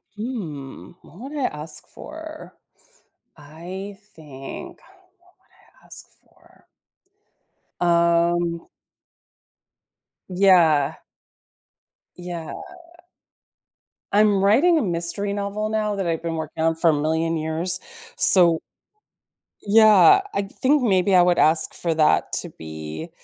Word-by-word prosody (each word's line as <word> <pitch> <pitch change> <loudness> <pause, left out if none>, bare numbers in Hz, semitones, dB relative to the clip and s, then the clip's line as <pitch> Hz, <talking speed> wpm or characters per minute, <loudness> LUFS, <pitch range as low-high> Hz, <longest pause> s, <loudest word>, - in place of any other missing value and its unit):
Hmm, 185 - -7
what 175 - -17
would 300 - -7
I 275 - -1
ask 150 -2 -6
for? 315 0 -11 0.8
I 175 +7 -9 0.2
think 135 -4 -10
what - - -23
would - - -28 0.8
I - - -22
ask - - -11 0.2
for? - - -27 1.1
Um. 170 0 +1 1.6
Yeah. 175 -7 +3 1.2
Yeah. 175 -3 -7 1.6
I'm 205 -1 +3
writing 275 - +4
a - - +1
mystery 175 +1 -3
novel 205 +1 -3
now 215 -1 -1
that 195 -3 -3
I've 165 -1 -2
been 165 -1 -3
working 160 0 -5
on 165 0 +1
for 165 0 +2
a - - 0
million 160 +2 -1
years, 160 +4 -2 0.4
so 170 -4 +5 1.0
yeah, 220 - +6
I 200 - -1
think 260 +8 0
maybe 195 -3 +2
I 180 - +7
would 175 -1 +2
ask 160 +1 +2
for 170 -2 -2
that 155 -1 +2
to - - -9
be 80 - -8
175 Hz, 110 wpm, -22 LUFS, 160-205 Hz, 1.6 s, I